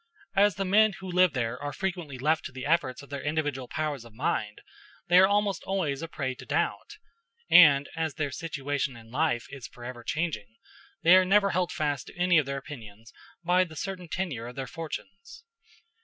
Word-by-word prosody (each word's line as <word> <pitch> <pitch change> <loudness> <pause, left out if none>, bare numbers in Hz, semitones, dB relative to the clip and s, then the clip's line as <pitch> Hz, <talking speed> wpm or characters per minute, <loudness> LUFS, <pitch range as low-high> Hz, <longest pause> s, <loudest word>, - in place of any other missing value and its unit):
As 200 -2 +4
the 195 - -2
men 210 +2 +4
who 190 0 -9
live 180 -1 +3
there 125 -1 -2
are 145 0 -3
frequently 175 -8 -4
left 155 +5 +1
to - - -6
the 130 0 -7
efforts 140 -4 0
of 140 - -15
their 140 - -4
individual 145 -4 -2
powers 150 -4 -3
of 115 -2 -15
mind, 105 -5 -2 0.5
they 175 +1 +7
are 190 - +7
almost 205 -2 +1
always 160 -8 -2
a 165 - -4
prey 135 -5 -3
to - - -12
doubt; - - -2 0.5
and 145 -5 +8
as 160 -2 -2
their 145 -3 -2
situation 145 -4 -3
in 115 0 -15
life 140 -3 0
is 140 -3 -8
forever 120 0 -9
changing, 150 -9 -3 0.5
they 170 +2 +8
are 185 - +6
never 200 +1 +3
held 180 0 0
fast 145 -3 -2
to - - -13
any 175 -1 +4
of 145 - -2
their 140 0 -2
opinions 115 -5 -10 0.3
by 180 +1 +4
the 165 -3 -9
certain 180 +1 -5
tenure 155 -10 -3
of 125 - -9
their 135 - -4
fortunes. 320 - -8
155 Hz, 195 wpm, -28 LUFS, 130-180 Hz, 0.5 s, and